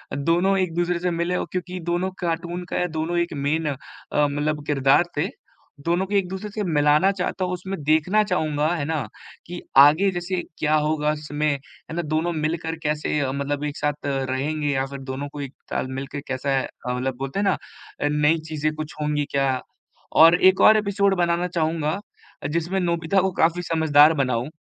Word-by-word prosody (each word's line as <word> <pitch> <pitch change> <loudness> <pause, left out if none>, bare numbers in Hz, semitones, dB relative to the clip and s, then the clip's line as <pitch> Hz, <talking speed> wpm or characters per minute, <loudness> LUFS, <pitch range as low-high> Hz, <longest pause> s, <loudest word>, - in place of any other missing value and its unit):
दोनों 175 +7 +2
एक 180 -3 0
दूसरे 175 0 0
से 180 0 -1
मिले 170 +2 -1
और - - -1
क्योंकि 180 0 -4
दोनों 175 +2 0
कार्टून 175 +1 -2
का 180 - 0
दोनों 160 +2 -2
एक 170 -1 0
मेन 150 +3 -1
अ, 140 - -2 0.5
मतलब 150 +1 -2
किरदार 140 +2 +4
थे। 165 +6 +1 0.6
दोनों 175 +3 +1
को 205 - -6
एक 195 -2 +2
दूसरे 190 +2 -5
से 210 0 -3
मिलाना 150 +2 +3
चाहता 185 0 -2
हूँ, 180 - -2
उसमें 185 -1 -5
देखना 160 +8 +3
चाहूँगा 155 -6 0
है 150 - -2
ना 160 -1 -1 0.5
कि 175 0 -6 0.2
आगे 155 +8 +7
जैसे 175 0 -2 0.2
क्या 155 0 +2
होगा 150 0 +1
उसमें, 150 0 -3
है 140 +3 -8
ना, 175 - 0
दोनों 160 +2 -1
मिलकर 160 +1 -2
कैसे 150 0 0
अ, 135 -2 0
मतलब 140 +1 -2
एक 145 - -4
साथ 150 -1 -2
अ, - - 0 0.2
रहेंगे 150 +3 -1
या 135 0 0
फिर 140 0 -8
दोनों 140 +2 -4
को 145 - -5
एक 135 -1 -6 0.2
साथ - - -1
मिल 135 - -5
के 145 0 -4
कैसा 135 +1 0
अ, - - -5 0.2
मतलब 125 +1 -2
बोलते 135 +7 -3
हैं - - +1
ना 195 - +2 0.5
नई 150 +2 +3
चीजें 155 0 -1
कुछ 155 -1 -6
होंगी 150 -1 0
क्या? 135 -2 +1 0.5
और 165 +2 +8
एक 190 0 +5
और 215 0 +8
एपिसोड 200 -1 +1
बनाना 175 0 +1
चाहूँगा, 160 0 -1 0.5
जिसमें 170 +4 -1
नोबिता 170 +2 +1
को 190 0 0
काफ़ी 170 +2 +3
समझदार 160 -2 +5
बनाऊँ, 125 +2 -1
160 Hz, 190 wpm, -23 LUFS, 145-175 Hz, 0.6 s, और